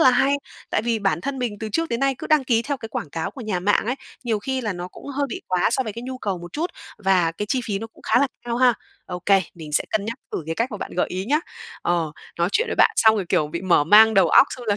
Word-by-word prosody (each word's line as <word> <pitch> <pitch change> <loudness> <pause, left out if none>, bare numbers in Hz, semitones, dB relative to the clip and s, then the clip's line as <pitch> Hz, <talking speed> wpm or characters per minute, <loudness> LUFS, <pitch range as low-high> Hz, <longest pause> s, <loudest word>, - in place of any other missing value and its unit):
là 260 - +7
hay, 270 +3 +3 0.4
tại - - +1
vì 230 -1 0
bản 195 -6 0
thân 275 +7 -4
mình 240 -5 -2
từ 220 - -3
trước 330 +6 0
đến 235 - -2
nay 275 0 +2
cứ - - -6
đăng 305 -3 +3
ký 235 -2 +2
theo 285 +2 -2
cái 225 -4 -8
quảng 160 - -5
cáo 160 +1 -3
của 270 - -11
nhà 210 -6 -2
mạng 205 +3 +2
ấy, 250 - 0 0.3
nhiều 225 -3 0
khi 265 +5 -2
là 215 -4 -2
nó 175 0 -6
cũng - - -13
hơi 285 0 -1
bị - - -5
quá 180 -1 +2
so 265 - +1
với 220 -4 -5
cái 235 - -7
nhu 255 +1 -6
cầu 200 -6 -2
một 175 0 -10
chút 330 +4 -2 0.3
và 185 -4 +2
cái 210 +5 -4
chi 260 - +2
phí 205 -3 -2
nó 225 - -6
cũng 225 - -22
khá - - +3
là 280 - +4 0.2
cao 235 -1 -2
ha. 245 -1 +5 0.4
Okay, 185 +2 +2
mình 160 -3 -10
sẽ - - +2
cân 215 -2 0
nhắc 225 +2 -3 0.2
thử - - -2
cái 165 - -2
cách 230 +8 -1
mà 210 - -5
bạn - - -6
gợi 180 - +2
ý 185 +1 -3
nhá. 295 +7 +2 0.4
Ờ, 165 -3 0 0.3
nói 170 +1 +2
chuyện 465 +2 +2
với - - -1
bạn - - +6
xong 220 -1 +6
rồi, 195 - -1
kiểu, 150 - +2
bị 170 +3 -5
mở 175 -5 +4
mang 220 +6 +7
đầu 190 -4 +5
óc, 265 - +7
xong 250 - -7
là, 205 -2 +2
220 Hz, 305 wpm, -23 LUFS, 180-255 Hz, 0.4 s, là